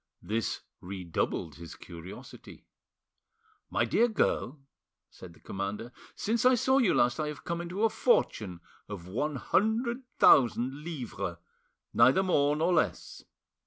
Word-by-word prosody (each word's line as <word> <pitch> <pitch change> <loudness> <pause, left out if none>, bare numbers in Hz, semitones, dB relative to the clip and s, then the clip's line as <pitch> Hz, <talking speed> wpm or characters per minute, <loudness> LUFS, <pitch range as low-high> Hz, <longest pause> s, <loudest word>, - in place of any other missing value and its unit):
This 110 +1 -2 0.2
redoubled 90 -4 -3
his 85 -1 -10
curiosity. 85 +1 -11 1.0
"My 120 - +1
dear 225 - +3
girl," 180 - 0 0.5
said 85 -2 -12
the - - -20
commander, 100 +5 -5 0.2
"since 225 +1 -1
I 255 0 +6
saw 265 +3 +3
you 230 -8 +3
last 120 +2 +2
I 155 - -1
have 150 -1 -7
come 170 0 -3
into 180 +5 -3
a 225 - +5
fortune 100 - +1 0.3
of 100 -5 -7
one 145 +10 -2
hundred 235 - 0 0.2
thousand 130 +3 +4
livres, 120 - -5 0.6
neither 130 +10 +5
more 145 -5 +2
nor 165 +4 +1
less. 160 - -1
135 Hz, 130 wpm, -29 LUFS, -, 1.0 s, I